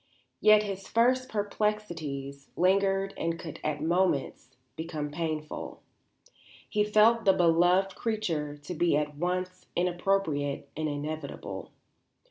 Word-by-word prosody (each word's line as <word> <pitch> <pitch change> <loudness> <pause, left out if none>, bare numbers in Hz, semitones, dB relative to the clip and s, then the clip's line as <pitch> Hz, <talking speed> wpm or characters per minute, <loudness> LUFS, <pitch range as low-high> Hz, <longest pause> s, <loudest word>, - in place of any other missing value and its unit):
Yet 215 0 +6
his 195 -2 -5
first 255 +3 +2
perplexities 170 -10 -3
lingered 195 +2 +2
and 165 0 -1
could 160 -3 -8
at 150 -1 -2
moments 165 -7 0 0.3
become 155 -2 -4
painful. 155 -1 -4 0.8
He 210 - +1
felt 215 +2 +4
the 195 - +5
beloved 180 +2 +3
creature 170 -11 -2
to 145 +4 -7
be 170 -2 +2
at 150 -1 -2
once 185 +2 -2
inappropriate 175 -5 0
and 155 0 -1
inevitable. 150 +1 -5
175 Hz, 110 wpm, -29 LUFS, 150-195 Hz, 0.8 s, Yet